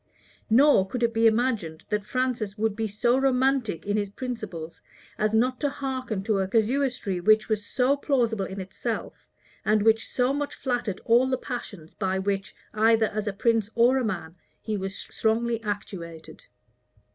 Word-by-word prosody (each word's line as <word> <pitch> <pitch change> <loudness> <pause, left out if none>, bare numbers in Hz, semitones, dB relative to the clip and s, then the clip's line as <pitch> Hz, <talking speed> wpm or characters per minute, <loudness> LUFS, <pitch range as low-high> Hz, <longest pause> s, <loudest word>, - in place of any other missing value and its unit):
Nor 240 -4 +5
could 240 +4 -3
it 230 0 +2
be 225 0 +4
imagined 220 -9 0
that 210 -1 0
Francis 235 -3 -2
would 215 -1 0
be 220 0 -1
so 235 +5 +1
romantic 265 -6 +1
in 205 +1 0
his 205 -1 -1
principles, 205 -9 -6 0.3
as 215 +1 0
not 250 +3 +2
to 290 - +1
hearken 260 -7 -3
to 210 -2 +1
a 190 - 0
casuistry 230 -2 0
which 215 +4 +4
was 215 -2 -1
so 255 +6 +1
plausible 235 -8 0
in 195 +1 -7
itself, 195 +5 -5 0.4
and 215 -1 +2
which 225 0 +3
so 250 +1 +1
much 290 0 -3
flattered 245 -7 -2
all 240 +3 +5
the 260 - +1
passions 205 - -7
by 190 -1 -1
which, 195 0 -2 0.2
either 225 +1 +4
as 215 0 -2
a - - +1
prince 225 +1 +1
or 245 +3 +4
a - - -1
man, 175 -7 -4 0.2
he 215 -1 -3
was 195 0 -4
strongly 230 +1 -1
actuated. 170 -6 -6
220 Hz, 170 wpm, -26 LUFS, 200-250 Hz, 0.4 s, Nor